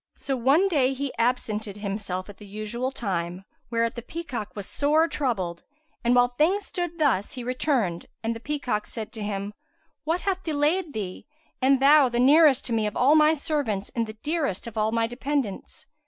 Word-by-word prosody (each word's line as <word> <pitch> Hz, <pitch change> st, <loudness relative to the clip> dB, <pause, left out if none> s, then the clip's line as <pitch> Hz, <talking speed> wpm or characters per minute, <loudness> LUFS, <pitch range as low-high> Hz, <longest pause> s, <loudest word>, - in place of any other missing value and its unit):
So 270 Hz, -, -2 dB
one 275 Hz, +10 st, +4 dB
day 275 Hz, -7 st, +2 dB
he 275 Hz, 0 st, -3 dB
absented 220 Hz, -4 st, -1 dB
himself 200 Hz, -2 st, -4 dB
at 205 Hz, -, -11 dB
the 210 Hz, -, -12 dB
usual 215 Hz, +5 st, -3 dB
time, 185 Hz, -6 st, -3 dB, 0.2 s
whereat 230 Hz, 0 st, 0 dB
the 235 Hz, -, -6 dB
peacock 245 Hz, -6 st, -6 dB
was 205 Hz, -2 st, -6 dB
sore 305 Hz, +3 st, +2 dB
troubled; 195 Hz, -, -2 dB, 0.4 s
and, 240 Hz, +1 st, +3 dB
while 245 Hz, 0 st, +5 dB
things 335 Hz, +11 st, +1 dB
stood 350 Hz, -2 st, -3 dB
thus, 265 Hz, -, +1 dB
he 250 Hz, -, -6 dB
returned 245 Hz, -, 0 dB, 0.2 s
and 230 Hz, +1 st, -1 dB
the -, -, -6 dB
peacock 250 Hz, -5 st, -2 dB
said 220 Hz, -2 st, -7 dB
to 220 Hz, -, -7 dB
him, 205 Hz, 0 st, -3 dB, 0.5 s
"What 330 Hz, +4 st, 0 dB
hath 380 Hz, -1 st, -1 dB
delayed 315 Hz, +1 st, 0 dB
thee, 195 Hz, 0 st, -5 dB, 0.3 s
and 265 Hz, +1 st, +4 dB
thou 280 Hz, 0 st, +6 dB
the 240 Hz, 0 st, -1 dB
nearest 285 Hz, +1 st, +6 dB
to 240 Hz, -, -2 dB
me 220 Hz, -2 st, +1 dB
of 210 Hz, -, -4 dB
all 270 Hz, +4 st, +5 dB
my 310 Hz, 0 st, +5 dB
servants 280 Hz, -, -2 dB
and 230 Hz, -2 st, -2 dB
the 215 Hz, 0 st, -9 dB
dearest 295 Hz, -, -1 dB
of 230 Hz, -2 st, -7 dB
all 215 Hz, 0 st, +1 dB
my 230 Hz, 0 st, +2 dB
dependents?" 250 Hz, -2 st, -3 dB
245 Hz, 185 wpm, -26 LUFS, 210-295 Hz, 0.5 s, thou